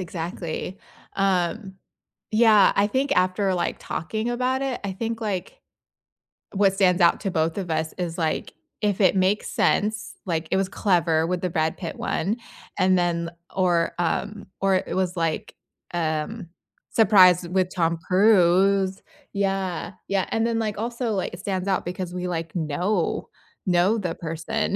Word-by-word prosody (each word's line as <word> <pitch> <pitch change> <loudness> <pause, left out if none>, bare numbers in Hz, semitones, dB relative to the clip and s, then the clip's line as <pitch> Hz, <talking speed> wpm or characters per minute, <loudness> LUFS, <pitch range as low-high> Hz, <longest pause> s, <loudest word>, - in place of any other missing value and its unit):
exactly. 175 +1 -5 0.4
Um, 190 +1 0 0.6
yeah, 215 -2 +6
I 200 - +4
think 270 +5 0
after 185 +1 +2
like, 175 -1 -1
talking 215 +8 -3
about 255 +2 0
it, 270 -2 -2
I 195 - -2
think 225 +3 -4
like 215 - -4 0.9
what 195 -1 +3
stands 190 -2 +3
out 170 - +4
to 195 - -2
both 160 +1 0
of 185 -4 -3
us 160 0 -1
is 175 -2 -3
like, 160 -2 -2 0.3
if 205 -2 0
it 190 0 +4
makes 190 +2 +1
sense, 210 0 0
like, 165 -3 -2
it - - +3
was 190 -1 0
clever 170 -5 +2
with 180 0 -1
the 180 - -1
Brad 160 -1 0
Pitt 170 - -6
one, 200 +8 -1 0.4
and 185 0 +4
then 170 -1 0 0.2
or, 175 -3 +2
um, 205 +5 -2
or 195 -1 +3
it 185 - -2
was 185 -1 0
like, 165 -1 -2 0.4
um, 170 +4 -2 0.4
surprised 185 -5 +6
with 185 -1 +2
Tom 170 -2 +1
Cruise. 190 0 +4 0.3
Yeah, 195 -2 -2 0.2
yeah, 195 -2 +1
and 225 0 0
then 230 -1 0
like 215 -2 -2
also 235 +2 -2
like 190 -3 -2
it 175 - -8
stands 190 0 -3
out 195 - 0
because 180 0 -4
we 180 0 -3
like, 165 -1 -4
know 175 +4 -1 0.4
know 180 +4 +3
the 180 -5 -3
person, 165 +6 -2
185 Hz, 160 wpm, -24 LUFS, 175-205 Hz, 0.9 s, yeah